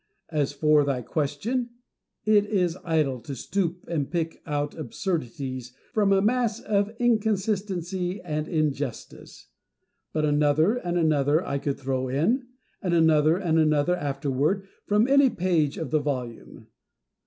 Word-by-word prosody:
As 145 -3 0
for 150 0 +3
thy 135 -3 -1
question, 180 - -2 0.6
it 210 -1 +4
is 180 -5 +1
idle 155 -7 +1
to 135 +4 -7
stoop 175 +5 -2
and 150 -5 -2
pick 165 -2 -3
out 145 -1 -1
absurdities 130 - -4 0.2
from 205 -2 +3
a 195 0 +4
mass 230 0 +1
of 205 -1 0
inconsistency 200 -5 0
and 155 -2 -3
injustice; 145 -5 -3 0.6
but 155 -1 0
another 150 +5 +3
and 175 -6 -2
another 155 -1 +2
I 140 - -2
could 140 0 -2
throw 130 -1 -2
in, 200 - +1 0.3
and 175 -2 0
another 160 0 +4
and 165 -4 +1
another 155 +2 +3
afterward, 145 +5 -1 0.2
from 210 +3 +3
any 280 0 +5
page 170 - 0
in 160 -5 -4
the 155 - +2
volume. 130 -5 -5
160 Hz, 135 wpm, -26 LUFS, 145-195 Hz, 0.6 s, any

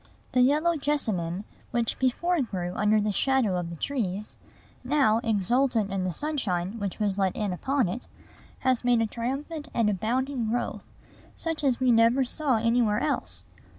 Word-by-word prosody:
The 250 - +3
yellow 305 +6 +3
jessamine, 210 - -1 0.3
which 235 -2 -1
before 325 +7 +1
grew 180 -7 -3
under 210 +2 +3
the 210 0 0
shadow 255 -3 +2
of 170 -1 -4
the 170 - -6
trees, 210 - -3 0.4
now, 255 -5 +3
exultant 225 0 +1
in 190 -1 -1
the 185 - -1
sunshine 205 - -2
which 200 -3 -3
was 205 -2 -1
let 190 -2 +1
in 205 -3 -1
upon 265 +5 0
it, 190 +8 -5 0.5
has 255 -2 +1
made 245 -2 +3
a - - +2
triumphant 275 +7 -4
and 225 -3 +3
abounding 240 +4 -1
growth, 245 +2 -2 0.5
such 325 -2 -4
as 260 -4 +2
we 255 -1 +3
never 230 +3 +4
saw 270 -1 0
anywhere 230 -2 +2
else. 290 - -2
235 Hz, 160 wpm, -27 LUFS, 205-270 Hz, 0.5 s, never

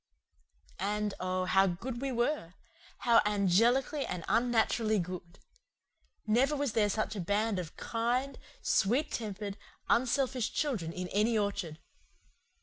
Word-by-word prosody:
And, 210 +1 -1
oh, 185 0 -1
how 195 +1 +4
good 235 +8 -4
we 275 -1 -1
were! 240 - -1 0.5
How 235 -1 +5
angelically 230 - +2
and 180 -7 -5
unnaturally 225 0 +2
good! 180 -1 -5 0.9
Never 250 +7 +3
was 285 -3 -1
there 210 -2 +3
such 215 +1 -1
a - - -4
band 205 +3 0
of 170 -4 -7
kind, 245 +4 -1 0.2
sweet 265 +10 +2
tempered, 205 -2 -4 0.3
unselfish 255 0 +1
children 220 - -1
in 180 +1 -4
any 220 +3 +2
orchard. 200 -6 -2
215 Hz, 125 wpm, -31 LUFS, 195-245 Hz, 0.9 s, How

